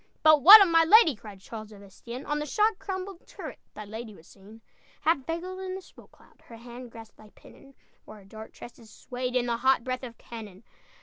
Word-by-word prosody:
"But 310 -2 +6
what 405 +7 +11
of - - 0
my 330 -1 +4
lady?" 330 - +5
Cried 205 -3 -13
Charles 215 +1 -10
of 200 -1 -14
Estienne. 235 +6 -10
"On 295 0 -2
the 300 - -4
shot 425 +6 0
crumbled 375 -1 -7
turret - - -10 0.2
Thy 215 - -8
lady 220 +1 -9
was 160 - -18
seen: 205 +3 -17 0.4
"Half 310 -5 0
veiled 360 +3 -5
in 375 -1 -6
the 380 - -8
smoke - - -19
cloud, - - -25
Her 230 - -12
hand 240 +1 -11
grasped 225 -1 -14
thy 215 - -17
pennon, 275 -1 -18 0.3
While 215 - -13
her 200 - -17
dark 220 +2 -12
tresses 235 -2 -14
swayed 250 +3 -6
In 250 -1 +1
the 235 -1 -2
hot 260 0 +2
breath 255 0 -4
of 240 -3 -10
cannon! 215 -4 -11
245 Hz, 220 wpm, -26 LUFS, 220-325 Hz, 0.4 s, what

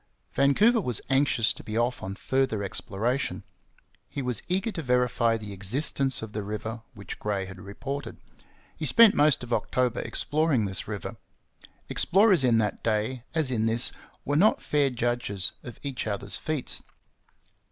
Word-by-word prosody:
Vancouver 205 - +4
was 125 - -3
anxious 135 -4 +3
to - - -12
be 110 +1 -4
off 120 +2 0
on 95 +1 -5
further 130 -3 0
exploration. 110 +6 -2 0.7
He 140 - -4
was 125 -4 0
eager 190 +5 0
to 170 - -5
verify 125 -3 +2
the 105 -2 -8
existence 130 +6 0
of 110 - -7
the 105 - -3
river 110 +3 -5
which 100 -2 -8
Gray 100 -2 -2
had 95 -1 -10
reported. 125 +6 -6 0.6
He 155 - -3
spent 230 - +7
most 145 -4 +3
of 120 -1 -4
October 125 -1 0
exploring 150 -7 0
this 95 -1 -2
river. 110 +2 -5 0.7
Explorers 195 -5 +3
in 120 -3 +4
that 105 -2 -1
day, 115 +3 -1
as 155 -5 +1
in 115 -2 +1
this, 115 +2 +3 0.3
were 145 - 0
not 200 +8 +4
fair 145 -2 +1
judges 120 -6 -1
of 120 -3 -10
each 135 -5 -4
other's 100 -2 +2
feats. 155 -4 0
125 Hz, 155 wpm, -27 LUFS, 110-140 Hz, 0.7 s, spent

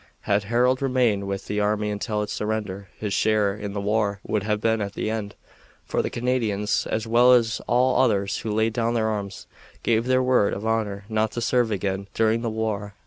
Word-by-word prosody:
Had 100 0 0
Harold 125 +4 +2
remained 125 -7 +1
with 100 0 -4
the 105 - -2
army 105 0 0
until 105 +1 -2
its 105 - -5
surrender 105 -2 -3
his 105 -2 -3
share 105 0 +2
in 105 -1 -6
the 100 - -3
war 100 0 0
would 105 - 0
have 105 +1 -1
been 110 0 +1
at 100 +1 -5
an - - -2
end, 110 -2 -3 0.5
for - - 0
the - - -2
Canadians, 115 -4 0
as 110 0 -1
well 120 +2 +5
as 115 -2 +2
all 125 +1 +3
others 100 -5 +1
who 110 - -5
laid 110 +1 +1
down 115 0 0
their 110 -1 +1
arms, 100 -2 -4 0.4
gave 115 +1 +1
their 130 0 +3
word 125 -5 +2
of 100 - -6
honor 105 -3 -1
not 110 0 0
to - - -3
serve 120 0 +2
again 100 -1 -2
during 115 +1 +2
the 115 - -1
war. 105 -2 -3
110 Hz, 205 wpm, -24 LUFS, 100-115 Hz, 0.5 s, well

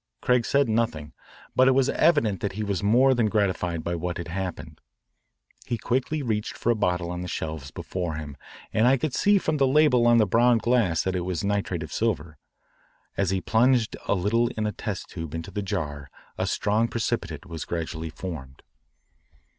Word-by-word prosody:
Craig 125 -2 +2
said 140 -1 +3
nothing, 110 -10 -1 0.4
but 130 - +5
it 130 - +6
was 135 0 +3
evident 145 - +2
that 100 - -3
he 105 +2 -3
was 100 -3 -2
more 125 +6 +4
than 120 -3 +2
gratified 90 -6 0
by 85 - -2
what 85 +1 -3
had 85 -1 -6
happened. 95 0 -5 0.9
He 120 - -1
quickly 130 +6 -1
reached 110 -4 -2
for 120 - +1
a - - +2
bottle 90 -4 0
on 90 0 -4
the 90 - -5
shelves 80 -5 -4
before 90 +2 -4
him, 75 -3 -7 0.4
and 110 +3 +4
I 135 +2 +5
could 145 0 -2
see 205 0 +4
from 155 -5 0
the 135 -2 +3
label 130 -4 +4
on 120 0 +6
the 110 - +5
brown 120 +4 +4
glass 115 -8 +2
that 95 0 -1
it - - 0
was 90 0 -3
nitrate 100 -4 -1
of 80 - -8
silver. 85 -9 -2 0.8
As 100 -2 0
he 95 -1 0
plunged 120 +2 +2
a - - +2
little 110 +6 +2
in 110 - 0
a 105 - 0
test 105 -1 -5
tube 80 -2 -6
into 80 0 -6
the 105 - -3
jar 75 -9 -4 0.3
a - - -2
strong 110 +3 +1
precipitate 95 -10 -3
was 85 -3 -6
gradually 80 -1 -4
formed. 75 -7 -8
100 Hz, 195 wpm, -25 LUFS, 85-120 Hz, 0.9 s, it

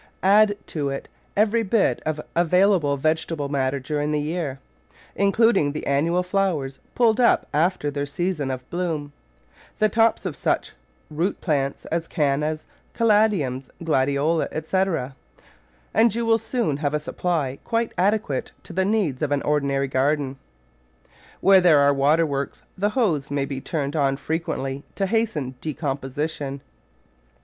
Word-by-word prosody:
Add 205 +2 +5
to 145 -3 -2
it 135 0 -5 0.3
every 215 +2 +3
bit 220 0 +1
of 155 -1 -1 0.2
available 175 -3 +3
vegetable 155 0 -1
matter 140 -1 0
during 145 +2 -2
the 150 - +1
year, 150 -2 -3 0.6
including 200 -6 +3
the 155 - -5
annual 165 +6 +1
flowers 180 -8 -1 0.2
pulled 230 -1 +3
up 240 - +4
after 155 -1 +1
their 145 0 -3
season 155 -2 -2
of 130 -1 -5
bloom, 160 -5 -3 0.6
the 215 - +3
tops 225 0 +2
of 170 -6 -3
such - - -1 0.4
root 170 +6 -1
plants 140 -5 -1
as 165 0 -1
Cannas, 150 0 0 0.3
Cala 220 -2 +4
diums, 135 -9 -3
Gladioli, 145 +1 +1
etc., 160 -4 -1 0.8
and 225 0 +4
you 235 0 -1
will 225 0 +3
soon 225 - -1
have 145 0 -1
a - - +1
supply 150 -4 -2
quite 230 0 -1
adequate 190 -8 0
to - - -10
the 190 +2 +1
needs 195 -11 0
of 150 -2 -1
an 145 -1 +1
ordinary 140 -2 +1
garden. 135 +1 0 1.0
Where 195 -1 +6
there 170 -4 +6
are 140 0 +5
water 145 +4 +3
works 140 -2 -4
the 205 +2 +1
hose 160 - +1
may 140 -1 -1
be 135 -1 -5
turned 145 -2 -3
on 135 -3 +1
frequently 140 -4 -3
to 195 - 0
hasten 190 - -1
decomposition. 140 -1 -3
155 Hz, 145 wpm, -23 LUFS, 140-190 Hz, 1.0 s, Where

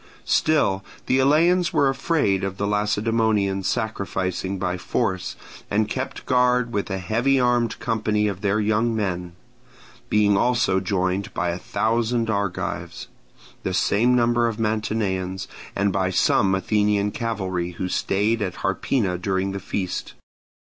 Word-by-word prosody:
Still 145 -12 +2 0.2
the 130 - +2
Eleans 165 +5 +3
were 140 - +3
afraid 135 - +1
of 95 0 -3
the 100 - -1
Lacedaemonians 105 -1 +1
sacrificing 95 -3 -2
by 90 -1 -1
force, 95 -1 -2 0.3
and 105 +1 +1
kept 130 +4 -4
guard 125 -1 +2
with 100 0 -1
a 95 - -2
heavy 115 +9 +1
armed 120 -2 +1
company 110 -2 0
of 100 -2 -4
their 100 +1 +1
young 110 +2 +1
men; 90 -5 -2 0.8
being 105 -1 +3
also 100 -4 +2
joined 95 0 -1
by 90 - 0
a 85 - -4
thousand 115 0 0
Argives, 100 -3 -3 0.5
the 95 - -2
same 120 +7 +3
number 120 -1 +3
of 115 -2 -3
Mantineans, 105 -4 -1 0.3
and 100 -1 +1
by 95 -1 +1
some 95 +1 +3
Athenian 105 +1 +1
cavalry 95 -7 -3
who 90 +2 -3
stayed 105 +5 0
at 95 -3 -4
Harpina 95 -1 0
during 95 0 0
the 100 - -4
feast. 95 -1 -4
105 Hz, 135 wpm, -23 LUFS, 95-115 Hz, 0.8 s, Eleans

